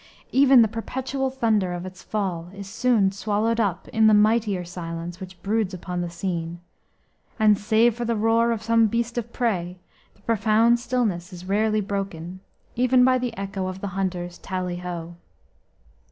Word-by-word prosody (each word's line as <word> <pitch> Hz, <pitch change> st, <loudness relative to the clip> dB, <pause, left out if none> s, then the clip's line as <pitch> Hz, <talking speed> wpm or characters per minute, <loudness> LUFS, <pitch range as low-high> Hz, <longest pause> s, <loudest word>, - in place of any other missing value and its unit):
Even 265 Hz, -2 st, +6 dB
the -, -, +2 dB
perpetual 265 Hz, +4 st, -3 dB
thunder 220 Hz, -8 st, +1 dB
of 175 Hz, +1 st, -5 dB
its 185 Hz, 0 st, -9 dB
fall 180 Hz, -5 st, -3 dB
is 200 Hz, -1 st, -8 dB
soon 225 Hz, -2 st, +2 dB
swallowed 215 Hz, +3 st, 0 dB
up 195 Hz, -4 st, -1 dB
in 220 Hz, 0 st, +4 dB
the 215 Hz, -, +6 dB
mightier 210 Hz, -3 st, +2 dB
silence 170 Hz, 0 st, -6 dB
which 185 Hz, -1 st, -10 dB
broods 205 Hz, -2 st, 0 dB
upon 180 Hz, 0 st, -4 dB
the 175 Hz, -, -3 dB
scene, 170 Hz, -1 st, -4 dB, 0.8 s
and, 215 Hz, -2 st, +5 dB
save 220 Hz, +3 st, +3 dB
for 240 Hz, +2 st, -5 dB
the 235 Hz, 0 st, 0 dB
roar 225 Hz, +2 st, +2 dB
of 225 Hz, -1 st, -2 dB
some 230 Hz, 0 st, +4 dB
beast 235 Hz, +2 st, -2 dB
of 235 Hz, 0 st, -7 dB
prey, 185 Hz, -8 st, -1 dB, 0.4 s
the -, -, -26 dB
profound 225 Hz, +2 st, +3 dB
stillness 220 Hz, -8 st, -1 dB
is 180 Hz, 0 st, -10 dB
rarely 215 Hz, +2 st, +1 dB
broken, 190 Hz, -3 st, -4 dB, 0.4 s
even 250 Hz, +1 st, +4 dB
by 255 Hz, 0 st, +4 dB
the 245 Hz, -4 st, -4 dB
echo 195 Hz, -1 st, -3 dB
of 185 Hz, 0 st, -5 dB
the 200 Hz, -, -4 dB
hunters' 180 Hz, -2 st, -3 dB
"tally 180 Hz, -2 st, -3 dB
ho." 175 Hz, -1 st, -6 dB
205 Hz, 170 wpm, -24 LUFS, 180-230 Hz, 0.8 s, Even